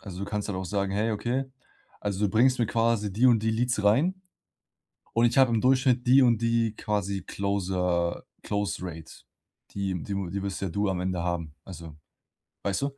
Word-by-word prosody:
Also, 95 -3 -9
du 100 - -3
kannst 105 +1 -3
halt 95 -2 -3
auch 95 - -4
sagen: 100 +1 -1
„Hey, 110 +3 0
okay, 120 +5 -1 0.6
also, 105 0 -1
du - - +3
bringst 125 +4 +3
mir 120 - +2
quasi 115 -3 0
die 115 +6 +3
und 115 -3 +4
die 110 - +2
Leads 120 -2 0
rein 155 - +3 0.9
und 115 +1 +3
ich 120 +2 +1
habe 130 -3 +5
im 115 - +2
Durchschnitt 130 -1 +2
die 130 +2 +7
und 120 -3 +3
die 115 -1 +1
quasi 100 -3 -2
Closer 90 -4 -1 0.2
Close 105 -1 -2
Rate.“ 80 -3 -7 0.6
Die 100 -1 -2
Die 100 - -5
Die 100 0 -3
wirst 100 -1 -4
ja 95 - -2
du 100 +4 -1
am 90 -2 -2
Ende 90 -1 -2
haben. 85 -3 -3
Also, 85 -4 -10 0.7
weißt 100 +3 -1
du? 140 0 -3
105 Hz, 195 wpm, -27 LUFS, 95-115 Hz, 0.9 s, die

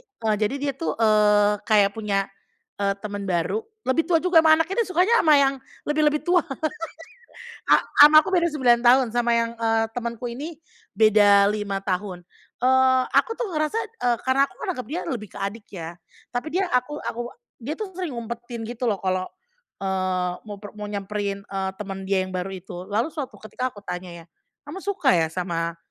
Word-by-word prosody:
e 400 - -7
jadi 215 +6 +1
dia 280 0 -2
tuh, 330 - -2
eee, 210 -1 +4
kayak 205 -2 +4
punya, 200 -2 0 0.6
e - - 0 0.2
teman 205 -1 -4
baru, 180 - 0 0.3
lebih 300 +5 +2
tua 335 -2 +4
juga 360 -3 +6
sama 315 0 +7
anaknya, 385 +8 0
dia 380 - -12
sukanya 370 +6 +3
sama 310 -2 +6
yang 275 0 +3 0.3
lebih 300 +1 +1
lebih 300 0 -1
tua 350 -2 +3 1.2
a - - +8 0.3
sama 305 +1 +9
aku - - -5
beda 340 -1 +3
9 245 -5 +3
tahun, 255 +2 +6
sama 240 0 +2
yang, 230 0 +1
eee, 225 0 +2
temanku 235 0 -4
ini 295 +7 -6 0.4
beda 205 -2 +6
5 200 -2 -3
tahun. 185 -1 -3 0.4
Eee, 260 0 +4
aku 455 - +3
tuh 480 -4 -3
ngerasa 310 +5 -1
,e 445 - -4 0.2
karena 260 +1 +3
aku - - -20
menganggap 345 - -4
dia 335 +6 -3
lebih 215 -5 -4
ke - - -9
adik 205 +2 -4
ya. 170 -2 -7 0.4
Tapi 245 +5 -3
dia 385 +2 +1
aku 250 +4 0
aku 240 +1 -4 0.3
dia 255 +6 -4
tuh 425 -3 -4
sering 360 -5 -4
ngumpetin 235 0 -6
gitu 240 +1 -5
loh 205 - +1
kalau, 185 0 0 0.5
eee, 185 -2 -1 0.2
mau 205 - -6
per 205 -1 -10
mau 210 0 -5
nyamperin, 200 0 -4
eee, 190 -1 -3
teman 195 -2 -6
dia 190 -1 +2
yang 185 - -9
baru 185 +1 -3
itu. 180 -1 -8
Lalu 220 +7 0
suatu 290 -5 -6
ketika 250 +4 -3
aku 205 - -11
tanya 180 -1 -6
ya, - - -28 0.4
"kamu 335 +7 -7
suka 365 -9 +1
ya 165 -2 +2
sama 170 -2 -3
230 Hz, 190 wpm, -24 LUFS, 200-295 Hz, 1.2 s, sama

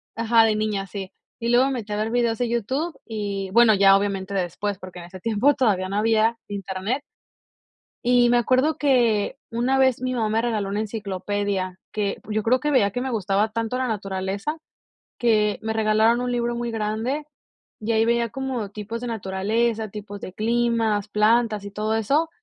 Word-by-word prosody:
ajá, 230 0 +4
de 220 - +2
niña, 210 -2 -1
sí, 195 -1 -7 0.3
y 235 0 -2
luego 245 +2 +5
me 275 - -1
metí 215 -4 -5
a - - -1
ver 215 +1 -1
videos 235 -2 +1
de 245 -2 -1
YouTube 265 +8 -2
y 200 -3 -4
bueno, 230 +1 +6
ya 195 0 +6
obviamente 200 -1 -2
después, 190 +2 -2
porque 185 -2 -9
en 170 - -9
ese 185 +2 -11
tiempo 230 +7 +2
todavía 195 -9 +1
no 200 - -2
había 225 +1 +2
Internet. 200 +5 -3 1.0
Y 245 0 +4
me 245 - +4
acuerdo 255 +6 +2
que 240 -7 +2
una 240 +3 +1
vez 260 -3 +3
mi 255 0 -2
mamá 220 -3 0
me 220 +1 +2
regaló 215 -4 -1
una 205 - -1
enciclopedia, 200 -3 -3
que, 205 -2 -1
yo 215 0 0
creo 250 +4 +3
que 295 +3 -1
veía 210 -8 +3
que 245 - -2
me 260 - -2
gustaba 205 -1 0
tanto 230 +2 -2
la 255 0 -1
naturaleza, 200 +5 -3 0.6
que 215 -4 +2
me 220 0 -1
regalaron 220 +2 +3
un 250 0 -1
libro 240 0 -1
muy 235 -1 -3
grande 225 +7 -2 0.5
y 220 +2 -1
ahí 220 0 +3
veía 235 0 +1
como 260 -6 -3
tipos 215 +2 -6
de 245 - -3
naturaleza, 220 +2 -1
tipos 205 -1 -8
de 185 - -7
climas, 225 -1 +1
plantas 215 0 +2
y 200 - -6
todo 215 +2 -2
eso, 285 +9 +1
220 Hz, 185 wpm, -23 LUFS, 205-240 Hz, 1.0 s, bueno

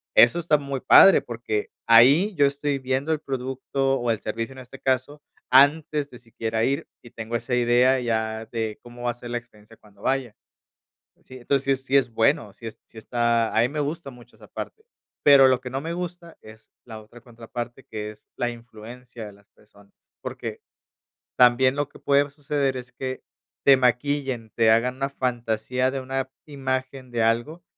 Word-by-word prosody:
eso 120 +9 +6
está 160 -3 +2
muy 140 -2 -5
padre 190 +8 +7
porque, 115 -3 -4 0.2
ahí 135 - +6
yo 145 -3 +4
estoy 140 0 -1
viendo 130 +4 -1
el 155 - 0
producto 135 0 -2
o 120 - -2
el 110 -2 0
servicio 115 +3 -4
en 130 - -12
este 130 +1 -12
caso, 135 +3 -1 0.3
antes 145 +2 +4
de 125 - -12
siquiera 115 -1 -3
ir 135 +3 -1 0.2
y 120 - -14
tengo 115 +1 -6
esa 125 +2 -3
idea 125 +2 +3
ya 110 -2 -2
de 110 -2 -4
cómo 120 0 -12
va 120 - +1
a - - -7
ser 120 0 -10
la 120 - -1
experiencia 115 -2 -14
cuando 100 -2 -22
vaya, 130 -3 -1 0.9
¿sí?, 130 - -12
entonces 135 +1 0
sí 130 - -18
sí, 135 - +3
es 130 -3 +2
bueno, 110 -2 +1
sí 115 +3 -9 0.2
sí 110 - -15
está 115 -1 0
a - - +5
mí 120 - +3
me 150 - -6
gusta 150 0 -4
mucho 125 -2 -17
esa - - -17
parte, 440 - -8 0.4
pero 140 -2 +7
lo 130 -1 +2
que 125 -1 -8
no 135 +2 -3
me 165 +3 -5
gusta 175 -1 -7
es 110 0 -16
la 110 -3 -9
otra 110 +3 -16
contraparte 120 +1 -8
que 105 -1 -6
es 105 0 -17
la 120 - -1
influencia 120 0 -11
de 105 - -10
las 100 +2 -23
personas, 100 -1 -23 0.3
porque - - -6 0.8
también 125 +2 +5
lo 145 0 -1
que - - -16
puede 140 0 +2
suceder 140 -2 -2
es 125 0 -9
que 130 0 -6 0.4
te 140 - +8
maquillen, 125 -2 0
te 115 -1 +4
hagan 120 +3 +2
una 135 +1 -2
fantasía 125 -1 -1
de 135 - -3
una 130 0 -4
imagen 130 -2 -4
de 120 - -1
algo 120 +10 -1
125 Hz, 190 wpm, -24 LUFS, 115-135 Hz, 0.9 s, te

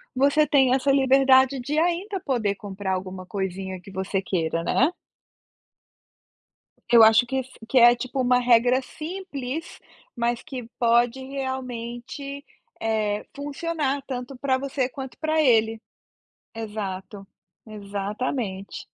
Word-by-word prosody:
você 285 +3 +3
tem 265 -3 +4
essa 270 +1 +1
liberdade 265 0 +5
de 290 +5 -3
ainda 355 +4 0
poder 225 -7 0
comprar 195 -1 -4
alguma 185 0 -5
coisinha 190 -1 -4
que 195 - -13
você 190 +1 -2
queira, 165 -3 -1
né. 270 - +3 2.0
Eu 230 -1 +9
acho 220 +2 +6
que 265 - -3
s 260 -1 -3 0.2
que 260 - +4
é, 240 0 +8
tipo, 255 +2 -3
uma 250 0 +4
regra 245 +1 +4
simples, 315 -3 -6 0.3
mas 235 0 -1
que 265 -6 -7
pode 240 +1 +3
realmente, 260 +1 -5 0.4
eh, 215 -2 -1
funcionar 285 -1 -2
tanto 255 0 -5
para 260 0 0
você 265 -1 -1
quanto 265 -1 -8
para 315 0 +1
ele. 225 -4 +3 0.8
Exato. 205 -2 -6 0.4
Exatamente. 205 0 -4
250 Hz, 120 wpm, -24 LUFS, 210-275 Hz, 2.0 s, Eu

